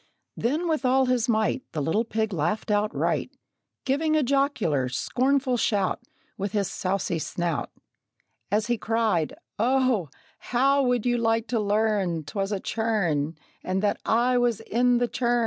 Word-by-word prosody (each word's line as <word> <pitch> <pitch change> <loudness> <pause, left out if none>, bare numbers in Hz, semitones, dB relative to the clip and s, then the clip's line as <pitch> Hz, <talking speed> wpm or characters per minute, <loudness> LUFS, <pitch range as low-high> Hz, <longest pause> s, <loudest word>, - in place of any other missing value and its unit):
Then, 300 +9 -1
with 310 -5 0
all 260 +1 +3
his 250 -2 +1
might, 220 +3 +1
The 155 - -2
little 205 +10 +1
pig 220 -2 -1
laughed 195 +7 -1
outright, 210 +1 0 0.6
Giving 310 +4 +1
a 305 - +3
jocular, 240 - +1
scornful 260 - +1
shout 205 -2 0 0.4
With 195 0 -3
his 200 -3 +1
saucy 185 -2 -1
snout, 170 -1 -2 0.8
As 210 +2 +1
he 240 -2 -1
cried, 220 -8 0 0.2
"O, 250 - +2 0.3
how 275 +3 +2
would 245 -3 +1
you 240 -1 +2
like 225 0 +1
to 235 -1 +1
learn 205 -5 +1
'Twas 195 +7 -3
a 200 - -1
churn, 180 -10 -1 0.3
and 190 +2 -1
that 205 - 0
I 245 +2 +2
was 240 -3 +1
in 245 +2 +2
the 245 0 +1
churn!" 240 0 0
225 Hz, 150 wpm, -26 LUFS, 195-250 Hz, 0.8 s, all